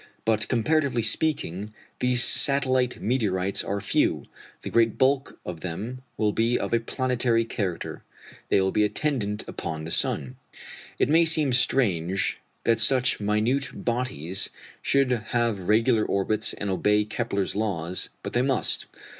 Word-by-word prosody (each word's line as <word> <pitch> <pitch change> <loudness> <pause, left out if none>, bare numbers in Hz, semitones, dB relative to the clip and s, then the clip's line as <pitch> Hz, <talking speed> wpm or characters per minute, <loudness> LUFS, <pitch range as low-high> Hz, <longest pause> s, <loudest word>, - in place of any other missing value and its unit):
But, 110 -2 +1
comparatively 130 0 +1
speaking, 105 - -1 0.2
these 125 -1 +4
satellite 130 -2 +2
meteorites 100 -6 0
are 100 +1 -2
few. - - 0 0.4
The - - -5
great 115 -2 +3
bulk 135 +1 +1
of 85 -3 -6
them 105 +9 -5 0.2
will 105 -1 +2
be 115 +3 +1
of - - -3
a 115 - +4
planetary 120 -1 0
character 100 -6 -4 0.5
they - - +4
will 95 0 +1
be 105 - +2
attendant 105 -2 -1
upon 80 -2 -5
the 80 - -5
sun. 65 -4 0 0.6
It - - +2
may 160 +4 +5
seem 155 -5 +2
strange 100 -8 +1 0.2
that 115 -1 +2
such 125 +2 +4
minute 110 +7 0 0.2
bodies 115 - -1 0.3
should 135 -2 +2
have 115 -4 -1
regular 110 +1 +3
orbits 105 +2 0
and 100 -1 -3
obey 105 +2 +2
Kepler's 105 -3 -2
laws, 90 -5 -2
but - - -5
they 120 - +2
must. 130 0 0
115 Hz, 140 wpm, -25 LUFS, 100-125 Hz, 0.6 s, may